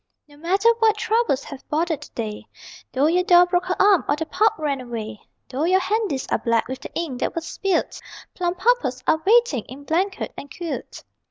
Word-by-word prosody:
No 290 - -18
matter 380 +9 +2
what 440 -1 +3
troubles 430 - +1
have 275 -2 -10
bothered 320 0 0
the - - -11
day, 215 -3 -5 0.4
Though 270 +2 +1
your 350 +3 +3
doll 355 0 +6
broke 355 0 0
her 370 - -2
arm 395 -3 +5
or 290 - +3
the 320 +2 -3
pup 435 +6 +2
ran 285 -4 -2
away; 225 -3 -6 0.3
Though 270 +5 -2
your 370 +2 +4
handies 380 -8 -1
are - - +2
black 230 -1 +1
with 260 +1 -5
the - - -9
ink 295 -7 -3
that - - -2
was 335 -1 -3
spilt 385 0 -1 0.3
Plumpuppets 360 - 0
are 315 - +2
waiting 435 - +3
in 270 +3 -11
blanket 360 +7 -1
and 285 - -9
quilt. 340 -2 -6
330 Hz, 195 wpm, -22 LUFS, 270-380 Hz, 0.4 s, doll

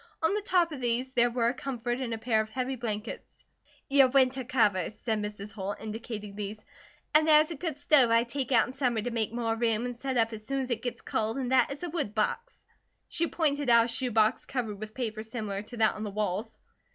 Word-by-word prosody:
On 320 - +3
the 420 - 0
top 360 -4 +2
of 280 -4 -6
these 245 +2 -1
there 240 -1 +4
were 235 -1 +1
a - - -1
comfort 245 -2 -3
and 255 -3 -3
a 225 - -2
pair 220 -1 +1
of 220 - -6
heavy 255 +3 -2
blankets. 225 -2 -6 0.4
"Your 275 -1 +6
winter 260 0 +3
covers," 215 -5 +1
said 220 -2 -2
Mrs. 210 0 -6
Holt, 200 -1 -5
indicating 215 -1 -6
these, 210 +1 -5 0.5
"and 310 +1 +5
there 305 -1 +8
is 310 +2 +1
a - - -3
good 320 -1 -4
stove 285 -4 +4
I 230 0 +4
take 260 +3 -4
out 230 -3 +5
in 250 - -8
summer 250 -5 0
to 245 - -2
make 225 -2 -1
more 230 -1 -1
room, 225 0 +1
and 245 0 -4
set 260 +1 -3
up 225 0 +2
as 215 -1 -7
soon 275 +4 -2
as 260 -1 -4
it 230 -1 -1
gets 245 - -4
cold, 220 +3 -1
and 260 -2 -2
that 260 0 +4
is 280 +5 -7
a 350 - -2
wood 290 -11 -2
box." 465 - -2 0.4
She 335 - +1
pointed 290 -5 0
out 235 -1 +6
a - - -4
shoe 250 +2 -1
box 220 +1 +2
covered 225 -6 -3
with 215 0 -8
paper 225 -4 -3
similar 215 -3 -4
to 235 +3 -10
that 220 -1 +3
on 215 - -6
the 210 - -3
walls. 210 +1 -2
235 Hz, 240 wpm, -29 LUFS, 220-265 Hz, 0.5 s, there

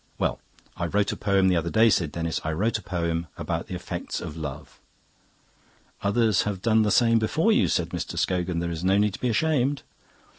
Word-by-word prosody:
"Well, - - -1 0.4
I 85 - -1
wrote 100 +3 +1
a - - -3
poem 100 -1 +2
the 90 - +3
other 85 0 0
day," 110 +3 +4
said 85 -7 +1
Denis; 85 -1 -3
"I 80 - -2
wrote 110 +7 0
a - - -12
poem 85 -2 -2
about 80 -1 -3
the 90 - -5
effects 90 - -5
of 80 -3 -7
love." 75 -3 -7 1.2
"Others 105 0 +2
have 100 -3 -3
done 110 -1 +4
the 105 - +2
same 115 +1 +4
before 155 - +1
you," 215 - +3
said 85 -1 0
Mr. 85 -1 -5
Scogan. 90 -1 0
"There 85 0 -2
is 85 0 -5
no 95 +1 +3
need 105 -1 +2
to - - -9
be 125 - +1
ashamed." 140 +2 +1
95 Hz, 210 wpm, -25 LUFS, 85-110 Hz, 1.2 s, day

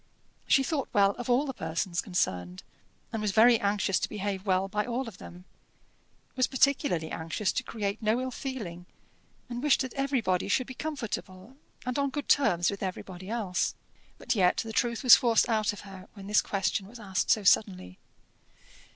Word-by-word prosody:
She 270 - +4
thought 280 -1 -2
well 200 -1 +4
of 245 - -5
all 250 +4 +3
the 265 - -4
persons 170 -1 -2
concerned, 90 - -2 0.5
and 225 - -2
was 210 - 0
very 230 +2 +6
anxious 200 -1 +1
to - - -2
behave 200 -1 -4
well 190 0 +2
by 210 +2 -1
all 245 +2 -3
of 210 -5 -10
them; 180 +1 -12 0.9
was 255 -1 +2
particularly 265 - +1
anxious 165 +5 -2
to - - -1
create 210 -3 -4
no 220 +2 +1
ill 255 0 -3
feeling, 200 -11 -6 0.6
and 240 -1 -5
wished 295 -1 +3
that 260 -2 -4
everybody 255 -11 0
should 250 +5 +1
be 260 - -8
comfortable, 230 -7 -6 0.3
and 250 +2 -2
on 280 0 +1
good 290 +1 -5
terms 175 - +3
with 200 - -7
everybody 185 0 -6
else. 210 -6 -1 0.4
But - - -1
yet 185 -5 +3
the 225 -1 -3
truth 235 +2 0
was 250 - +10
forced 235 -2 +3
out 215 -3 +1
of 205 - -9
her 195 -1 -11
when 195 -2 -10
this 210 +1 +3
question 195 0 -1
was 235 +3 -12
asked 195 -3 -2
so 215 - +3
suddenly. 185 - +2
210 Hz, 180 wpm, -28 LUFS, 185-245 Hz, 0.9 s, was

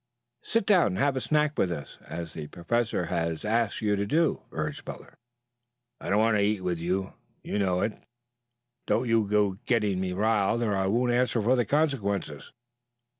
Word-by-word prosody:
Sit 230 -3 0
down 190 -6 +5
and 95 - -2
have 140 +5 +2
a 130 - -1
snack 150 +4 +1
with 90 - +2
us, 75 -4 -7
as 85 0 -6
the 75 -2 -6
Professor 110 +3 -1
has 85 0 -2
asked 115 0 0
you 105 -1 +2
to 100 0 -2
do," 160 +6 +1
urged - - -4
Butler. - - -9 0.9
"I - - -6
don't 100 - +3
want 110 0 +3
to - - +2
eat 105 -1 +1
with 90 -2 -2
you. 95 +3 -2 0.3
You 105 - -2
know 90 -2 +1
it. 105 - 0 0.9
Don't 125 +2 +1
you 115 -2 +2
go 105 -1 +2
to 95 - -16
getting 105 -6 +1
me 90 -1 -2
riled 110 +3 +1
or 105 -3 0
I 95 0 0
won't 120 +5 +2
answer 125 0 +2
for 115 +4 +3
the 120 -2 +1
consequences." 100 - -1
105 Hz, 190 wpm, -27 LUFS, 95-120 Hz, 0.9 s, down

